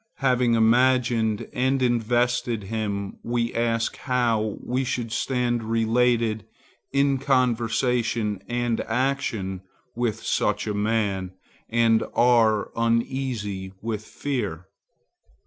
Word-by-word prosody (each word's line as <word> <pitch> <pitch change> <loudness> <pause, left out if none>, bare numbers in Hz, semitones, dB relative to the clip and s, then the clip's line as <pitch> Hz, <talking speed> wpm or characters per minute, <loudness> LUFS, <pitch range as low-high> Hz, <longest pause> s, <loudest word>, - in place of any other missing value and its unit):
Having 125 -3 +2
imagined 115 -1 +2
and 130 +2 +1
invested 120 -1 +1
him, 100 -1 -3
we 120 0 -1
ask 115 -1 0
how 115 -5 0
we 130 +2 -1
should 120 -3 -3
stand 120 0 0
related 115 0 +1 0.5
in 140 -1 +2
conversation 120 -4 +1
and 120 -1 -1
action 115 -6 -1 0.3
with 120 -3 -2
such - - 0
a 105 - -2
man, 100 -3 -1 0.4
and 115 -1 +3
are 115 -3 +3
uneasy 115 -5 -1
with 110 -1 -4
fear. 105 - -4
115 Hz, 95 wpm, -24 LUFS, 110-125 Hz, 0.5 s, and